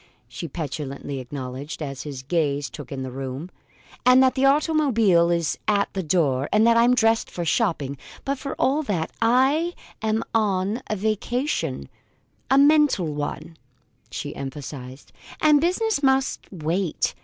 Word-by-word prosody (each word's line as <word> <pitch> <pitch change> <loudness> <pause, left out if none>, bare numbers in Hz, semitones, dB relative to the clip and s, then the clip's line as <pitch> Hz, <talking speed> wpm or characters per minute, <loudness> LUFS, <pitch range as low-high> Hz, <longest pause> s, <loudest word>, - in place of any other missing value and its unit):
she 170 - -6
petulantly 140 -2 -5
acknowledged, 130 +3 -6
as 140 -4 -5
his 140 -3 -7
gaze 145 -2 -1
took 145 -2 -9
in 135 -1 -4
the 130 - -5
room; 135 +6 -6 0.5
"and 255 +1 +6
that 260 - +4
the 265 - -1
automobile 275 - +3
is 170 -2 0
at 200 -1 +1
the 195 - -2
door; 145 -6 +1
and 215 +1 +4
that 230 0 +5
I'm 240 +2 +5
dressed 225 -1 +2
for 175 - -4
shopping. 150 - 0 0.3
But 275 0 -1
for 275 0 -5
all 285 +4 +1
that 190 - -2
I'm 255 -2 +1
on 205 0 +1
a 215 - -1
vacation 215 - -2 0.6
a 270 - +4
mental 285 - +4
one," 150 +2 -5 0.5
she 145 +4 -5
emphasized; 135 -4 -8 0.3
"and 300 -2 +5
business 370 +1 +1
must 265 -1 +1
wait. 175 0 -1
185 Hz, 145 wpm, -24 LUFS, -, 0.6 s, and